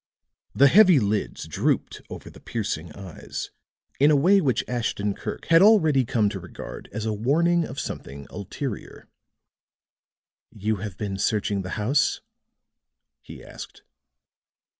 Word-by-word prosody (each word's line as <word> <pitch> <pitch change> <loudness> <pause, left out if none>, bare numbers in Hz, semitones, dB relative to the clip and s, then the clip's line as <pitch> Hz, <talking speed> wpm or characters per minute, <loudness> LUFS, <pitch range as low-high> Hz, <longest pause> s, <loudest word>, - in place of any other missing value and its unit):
The 140 - +6
heavy 185 0 +7
lids 105 -1 -2
drooped - - -1
over - - -9
the - - -15
piercing 95 -8 -4
eyes 95 -5 -8 0.5
in 145 +2 +5
a 150 - +5
way 185 +8 +4
which 135 -7 +1
Ashton 115 -4 -2
Kirk - - -7
had 165 0 +6
already 160 - +5
come 110 -2 +1
to 100 - -6
regard 90 -1 -9
as 110 +3 -4
a 110 - -1
warning 165 +10 +2
of 130 - -7
something 70 +1 -6
ulterior. 105 +7 -6 1.4
"You 110 0 -2
have 100 -2 -7
been 100 -2 -4
searching 105 -1 0
the 90 -1 -5
house?" 130 +7 +1 1.0
he - - -12
asked. - - -11
110 Hz, 135 wpm, -24 LUFS, 100-145 Hz, 1.4 s, heavy